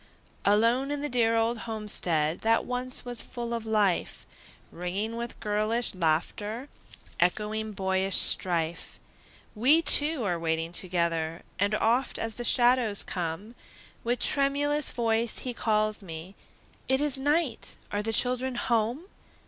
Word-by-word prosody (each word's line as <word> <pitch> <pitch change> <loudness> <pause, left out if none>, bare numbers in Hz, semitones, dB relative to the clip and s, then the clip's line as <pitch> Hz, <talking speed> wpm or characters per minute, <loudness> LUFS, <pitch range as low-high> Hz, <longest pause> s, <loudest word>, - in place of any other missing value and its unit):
Alone 230 +6 +3
in 290 0 -3
the 295 - -3
dear 230 -2 +2
old 225 +1 0
homestead 175 -7 0
That 225 +1 +1
once 250 +1 -2
was 245 -1 0
full 235 -1 -6
of 230 -1 -4
life, 210 -4 0 0.5
Ringing 195 +6 -4
with 235 0 -6
girlish 215 +3 -1
laughter, 205 - -2 0.5
Echoing 215 +4 -1
boyish 190 0 0
strife, 170 -2 +1 0.5
We 275 +9 +3
two 295 -4 +6
are 175 -4 -1
waiting 165 0 -2
together; 170 -2 -2 0.2
And 200 +2 +1
oft, 240 +4 +1
as 225 0 -4
the 240 - -6
shadows 240 -4 +4
come, 180 +5 -4 0.5
With 240 +1 -1
tremulous 290 +1 +1
voice 230 -1 +1
he 250 - -3
calls 215 -2 0
me, 170 0 -9 0.6
"It 265 0 +4
is 290 -2 +1
night! 290 -2 -1
are 205 - -1
the 225 +2 -2
children 250 +3 +1
home?" 235 +4 0
225 Hz, 135 wpm, -27 LUFS, 190-245 Hz, 0.6 s, two